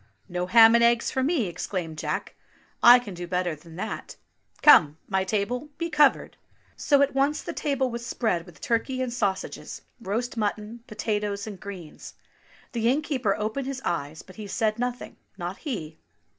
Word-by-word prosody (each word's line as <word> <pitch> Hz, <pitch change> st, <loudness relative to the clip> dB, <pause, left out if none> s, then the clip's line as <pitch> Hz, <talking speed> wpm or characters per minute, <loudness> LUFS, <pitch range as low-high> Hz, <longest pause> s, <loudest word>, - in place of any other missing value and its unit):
"No 180 Hz, 0 st, -3 dB
ham 225 Hz, +3 st, +8 dB
and 235 Hz, 0 st, +5 dB
eggs 235 Hz, 0 st, +3 dB
for 260 Hz, -, 0 dB
me!" 275 Hz, -3 st, +1 dB
exclaimed 170 Hz, -3 st, -4 dB
Jack. -, -, -3 dB, 0.5 s
"I 240 Hz, +1 st, +10 dB
can 235 Hz, -6 st, -6 dB
do 175 Hz, 0 st, -6 dB
better 180 Hz, -1 st, -1 dB
than 160 Hz, +2 st, -15 dB
that. 185 Hz, -, -5 dB, 0.2 s
— -, -, -33 dB
Come, 155 Hz, -, +7 dB
my 190 Hz, -1 st, +1 dB
table, 220 Hz, +8 st, -2 dB
be 335 Hz, +1 st, -3 dB
covered 295 Hz, -2 st, +3 dB, 0.2 s
!" -, -, -35 dB
So 285 Hz, -1 st, +3 dB
at 280 Hz, -, 0 dB
once 275 Hz, +2 st, +1 dB
the -, -, -5 dB
table 270 Hz, -3 st, -1 dB
was 235 Hz, 0 st, -5 dB
spread 190 Hz, -8 st, -1 dB
with 165 Hz, -5 st, -15 dB
turkey 255 Hz, +3 st, 0 dB
and 245 Hz, -2 st, -3 dB
sausages, 200 Hz, -5 st, -3 dB, 0.2 s
roast 230 Hz, +4 st, -3 dB
mutton, 215 Hz, +2 st, -2 dB
potatoes, 210 Hz, -2 st, -2 dB
and 205 Hz, -4 st, -8 dB
greens. 190 Hz, -6 st, -9 dB, 0.6 s
The 230 Hz, -1 st, +1 dB
innkeeper 260 Hz, -7 st, 0 dB
opened 220 Hz, +6 st, -3 dB
his 270 Hz, -1 st, -4 dB
eyes, 155 Hz, -2 st, -3 dB
but 185 Hz, -, -16 dB
he 215 Hz, -1 st, -7 dB
said 215 Hz, +2 st, 0 dB
nothing, 245 Hz, 0 st, -4 dB, 0.2 s
not -, -, -5 dB
he 165 Hz, -, -6 dB
220 Hz, 175 wpm, -26 LUFS, 190-250 Hz, 0.6 s, I